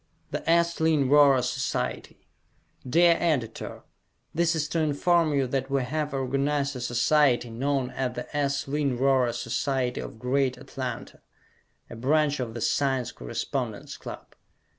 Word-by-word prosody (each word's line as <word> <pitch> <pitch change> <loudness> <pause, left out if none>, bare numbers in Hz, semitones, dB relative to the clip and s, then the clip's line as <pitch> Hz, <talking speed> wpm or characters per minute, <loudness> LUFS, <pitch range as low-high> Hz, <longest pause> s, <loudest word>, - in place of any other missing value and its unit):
The - - -2
S: 170 0 +3
Lynn 160 -4 +3
Rhorer 140 -3 +6
Society 125 - -3 0.6
Dear 170 +4 +5
Editor: 145 -10 -2 0.5
This 170 +1 +2
is 150 -2 -1
to 165 - -1
inform 160 +2 +2
you 140 -2 +1
that 135 +1 -2
we 135 -1 +1
have 150 +3 -2
organized 140 +1 -1
a 125 - -5
society 120 0 +2
known 130 +2 -1
as 130 -2 -3
the 125 +4 -7
S. 140 -1 0
Lynn 140 -3 0
Rhorer 130 -2 +3
Society 125 +1 -1
of - - -8
Greater 130 +1 0
Atlanta, 130 -3 -6 0.7
a - - -9
branch 145 +4 +1
of 120 -3 -4
the 120 - -5
Science 135 -2 0
Correspondence - - -4
Club. - - -9
135 Hz, 140 wpm, -26 LUFS, 125-150 Hz, 0.7 s, Rhorer